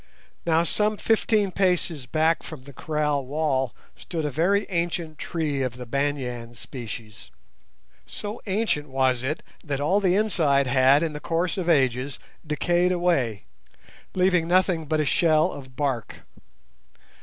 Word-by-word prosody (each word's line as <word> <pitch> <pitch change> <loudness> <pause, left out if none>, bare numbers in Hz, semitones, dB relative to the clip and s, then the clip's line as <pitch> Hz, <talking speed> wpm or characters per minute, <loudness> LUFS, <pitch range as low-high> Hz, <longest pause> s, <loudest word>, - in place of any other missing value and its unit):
Now 165 0 +4
some 210 +4 +1
fifteen 215 -2 +2
paces 175 -8 0
back 160 +3 +2
from 155 -5 -9
the 140 +1 -12
kraal 150 0 -1
wall 135 -3 -1 0.2
stood 165 -3 -4
a 150 - -1
very 185 +9 +2
ancient 170 -3 -2
tree 150 -5 -2
of 125 -2 -2
the 125 - -7
banyan 125 -3 -2
species. 115 -3 -8 0.8
So 210 +2 -6
ancient 190 -8 0
was 130 -2 +1
it 145 +5 -3 0.2
that 140 -4 -3
all 180 +8 +2
the 185 -3 +2
inside 160 -10 +2
had 130 +3 +4
in 160 -2 -1
the 150 - -5
course 170 +3 -1
of 180 -3 -2
ages 130 -4 +2 0.3
decayed 175 +3 +1
away, 165 - +1 0.7
leaving 180 -2 +3
nothing 180 -3 +2
but 155 +1 +1
a 155 - +1
shell 160 +2 +3
of 130 -2 -10
bark. 130 -4 -3
155 Hz, 145 wpm, -25 LUFS, 135-175 Hz, 0.8 s, Now